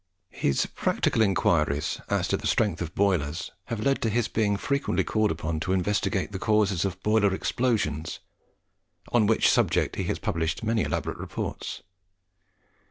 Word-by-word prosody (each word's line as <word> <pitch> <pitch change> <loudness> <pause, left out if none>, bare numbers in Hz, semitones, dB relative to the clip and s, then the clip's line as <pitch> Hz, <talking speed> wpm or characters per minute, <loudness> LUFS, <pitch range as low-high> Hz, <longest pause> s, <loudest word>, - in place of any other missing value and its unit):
His 70 - +1
practical 115 - 0
inquiries 75 -7 +1
as - - +1
to - - +2
the - - -3
strength 100 -6 +1
of 85 -2 -5
boilers 85 -6 0
have 115 - -4
led 135 0 +2
to 115 - +1
his 115 +1 +1
being 105 -2 +1
frequently 140 +7 0
called 110 -1 +1
upon 80 -1 -2
to 95 +4 -1
investigate 95 +1 0
the 95 - -5
causes 100 -4 +2
of 95 -1 -4
boiler 105 -2 +3
explosions, 90 - -1 0.9
on 115 -4 +3
which 110 - +4
subject - - +1
he - - -1
has - - -1
published 80 +3 -2
many 110 0 +1
elaborate - - -2
reports. - - -5
100 Hz, 155 wpm, -26 LUFS, 85-110 Hz, 0.9 s, which